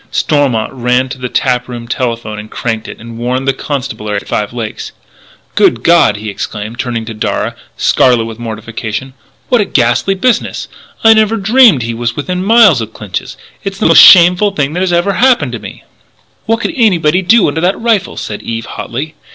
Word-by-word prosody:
Stormont 140 -7 0
ran 125 +1 0
to 130 0 -7
the 125 0 -4
tap 125 -1 0
room 120 -2 -8
telephone, 115 -4 -4
cranked 115 -2 -4
it, - - -9
and 115 0 -10
warned 125 +3 -2
the 135 - +2
constabulary 130 -8 -4
at - - -7
Five 105 -1 -2
Lakes. 115 -3 -6 0.6
"Good 120 0 +2
God!" 165 -11 +4
he 105 0 -6
exclaimed, 105 +3 -6
turning 115 -2 -3
to 115 - -7
Darragh, 110 - -2 0.2
scarlet 120 -3 +2
with 115 0 -8
mortification, 115 +2 -6 0.4
"what 245 -3 +3
a - - 0
ghastly 125 +6 +1
business! 240 +5 -1 0.4
I 225 0 +7
never 220 0 +2
dreamed 220 - +4
he 115 0 -3
was 120 0 -3
within 180 +5 -3
miles 205 - +5
of 110 0 -7
Clinch's! 100 -4 -6 0.3
It's 195 -1 -5
the 215 - -2
most - - +7
shameful 180 +3 +7
thing 145 0 -1
that 180 +1 -1
ever 175 +3 +1
happened 250 +5 +2
to - - -5
me - - -11 0.3
" - - -39
"What 225 +1 0
could 330 - -2
anybody 185 - +2
do 210 +4 +4
under 150 +2 -2
that 180 +3 0
rifle?" 225 -4 0
said 105 - -6
Eve 115 0 -5
hotly. 140 +9 -6
130 Hz, 185 wpm, -12 LUFS, 115-185 Hz, 0.6 s, I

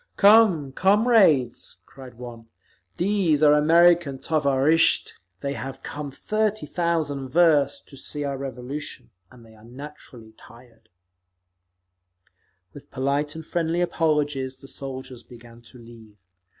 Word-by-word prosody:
"Come, 200 -9 +5
comrades," 190 - +2
cried 130 -2 -14
one, 120 -1 -11 0.5
"these 175 -5 +1
are 150 -1 +6
American 165 -1 +4
tovarishtchi. 145 +2 +2 0.3
They 140 0 -3
have 135 +2 -8
come 145 -1 -6
thirty 215 +8 -2
thousand 155 -6 -2
versts 145 -3 +3
to - - -17
see 145 +2 -6
our 140 -1 -3
Revolution, 135 - -7 0.2
and 120 -2 -17
they 110 - -18
are 110 -1 -19
naturally 125 -3 -12
tired…." 115 -2 -19 1.8
With 145 - -14
polite 140 +3 -2
and 160 -1 -8
friendly 170 +1 -2
apologies 145 -6 -1
the 135 - -14
soldiers 130 -2 -8
began 120 -1 -16
to - - -15
leave. 115 -3 -16
140 Hz, 120 wpm, -24 LUFS, 130-165 Hz, 1.8 s, are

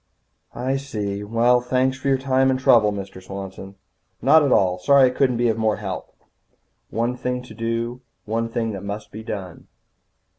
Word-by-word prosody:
"I 130 +3 -1
see. 105 -7 -4
Well, 120 +3 +3
thanks 130 +1 +1
for 130 +1 -5
your 135 -1 +3
time 130 0 +2
and 130 0 +1
trouble, 110 -5 +5
Mr. 95 -2 -7
Swanson." 95 0 -8 0.4
"Not 150 +6 +6
at 140 -3 +1
all. 90 -2 +3
Sorry 135 +8 +5
I - - +4
couldn't 125 -2 +1
be 120 0 +2
of 115 -1 0
more 110 -1 +2
help." 95 -3 -6 0.7
One 120 +2 -1
thing 125 0 -3
to 125 - -12
do. 115 +2 -3 0.2
One 115 +2 -1
thing 115 -1 -2
that 100 -3 -6
must 100 +2 -6
be 110 - -8
done. 95 -5 -7
115 Hz, 180 wpm, -22 LUFS, 105-130 Hz, 0.7 s, Not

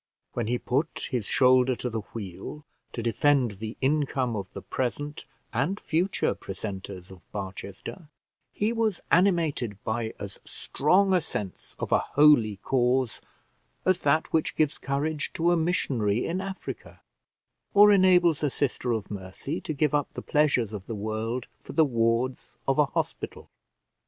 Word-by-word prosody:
When 120 -3 -2
he 125 +2 +1
put 140 +7 -2
his 120 -6 -1
shoulder 130 0 +4
to 125 - -4
the 115 -2 -2
wheel 110 +8 -7 0.3
to 115 - -4
defend 130 +1 +3
the 110 +1 -5
income 135 -3 +1
of 95 -3 -5
the - - -7
present 145 +4 -3 0.3
and 145 - 0
future 175 +5 0
precentors 95 -1 -7
of 95 -2 -12
Barchester, 100 - -7 0.4
he 210 - 0
was 225 -5 0
animated 165 - +2
by 110 0 -2
as 100 -1 -7
strong 190 +7 +2
a 180 - +4
sense 100 - -5
of - - -4
a - - +5
holy 145 -8 +5
cause, 125 -2 +1 0.6
as 185 -1 +3
that 150 +3 +1
which 160 -1 +1
gives 155 -2 +1
courage 145 +3 -1
to 170 +1 +3
a - - +4
missionary 125 - +1
in 180 +3 -1
Africa, 195 0 -7 0.7
or 205 +1 +9
enables 180 -5 +5
a 150 - +2
sister 130 -2 -1
of 110 -3 -4
mercy 100 - -5
to - - -4
give 150 0 +1
up 145 -1 +1
the - - -6
pleasures 135 -8 +2
of 100 -3 -7
the 115 - -4
world 110 +4 -3
for - - -10
the 160 - +5
wards 120 0 0
of 135 +1 +2
a 150 - +6
hospital. - - -4
130 Hz, 155 wpm, -27 LUFS, 110-155 Hz, 0.7 s, or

